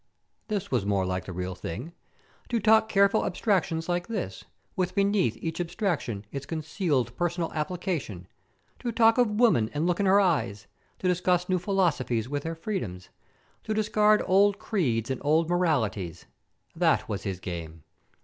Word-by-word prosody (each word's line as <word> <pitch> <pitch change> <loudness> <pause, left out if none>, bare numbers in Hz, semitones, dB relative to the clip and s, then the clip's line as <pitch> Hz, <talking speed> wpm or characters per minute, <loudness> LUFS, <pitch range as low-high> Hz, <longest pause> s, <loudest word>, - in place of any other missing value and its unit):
This 205 -4 -3
was 125 -6 +1
more 100 -2 +1
like 90 0 -2
the - - -6
real 90 +1 -4
thing. 100 - -6 0.6
To 235 - +1
talk 220 +1 +4
careful 200 +1 +4
abstractions 175 -6 0
like 175 0 -1
this, 220 -5 -4 0.3
with 185 0 -1
beneath 200 -1 +2
each 165 +1 -3
abstraction 170 - -2
its 140 -1 -6
concealed 155 - -1
personal 175 0 -1
application, 155 - -3 0.5
to 240 - -3
talk 225 +1 +4
of 245 -3 +4
woman 210 - +3
and 150 +3 0
look 175 +1 +1
in 200 - +2
her 195 +2 +6
eyes, 155 - 0 0.3
to 185 - -2
discuss 180 0 +1
new 185 -1 +2
philosophies 150 - 0
with 145 +1 -2
their 165 +2 -4
freedoms, 160 - -5 0.5
to 215 - -2
discard 215 0 +3
old 200 +2 +4
creeds 130 - -1
and 130 - -3
old 155 +3 +3
moralities 115 - 0 0.5
that - - +2
was 100 -1 -3
his 95 -2 -4
game. 80 -3 -7
170 Hz, 160 wpm, -27 LUFS, -, 0.6 s, her